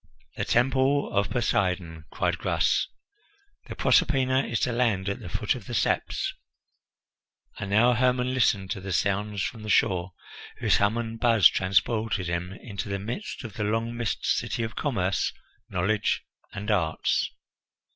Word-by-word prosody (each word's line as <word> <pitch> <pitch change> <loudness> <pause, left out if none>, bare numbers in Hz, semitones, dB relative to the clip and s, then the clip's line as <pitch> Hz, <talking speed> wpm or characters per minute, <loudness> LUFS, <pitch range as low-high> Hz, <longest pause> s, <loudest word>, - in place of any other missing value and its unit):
"The - - -2
Temple 135 +3 +2
of 100 0 +2
Poseidon!" 90 -9 -1
cried - - -1
Gras. - - +1 0.8
"The - - -7
Proserpina 130 -1 +3
is 115 - -1
to 125 - +1
land 115 -6 +1
at 100 - -2
the - - -8
foot - - 0
of - - -9
the - - -4
steps." - - 0 1.3
And 100 - -4
now 115 +5 +5
Hermon 125 +1 +1
listened 100 -7 +1
to 95 - -3
the 95 0 -4
sounds 100 +2 0
from 115 - -4
the 105 - -7
shore, 95 -3 +2 0.4
whose - - +3
hum 105 +3 +2
and 115 -1 -4
buzz 115 -4 +6
transported 105 +1 +1
him 85 +1 -2
into 100 0 -6
the 100 - -1
midst 120 - -5
of 115 -5 -7
the 105 - -3
long 115 +3 -1
missed 120 -2 -2
city 120 -3 0
of 115 +1 -5
commerce, 100 -10 0 0.4
knowledge, 105 +4 0 0.3
and 105 +2 -3
arts. 80 -6 +1
105 Hz, 155 wpm, -26 LUFS, 95-120 Hz, 1.3 s, buzz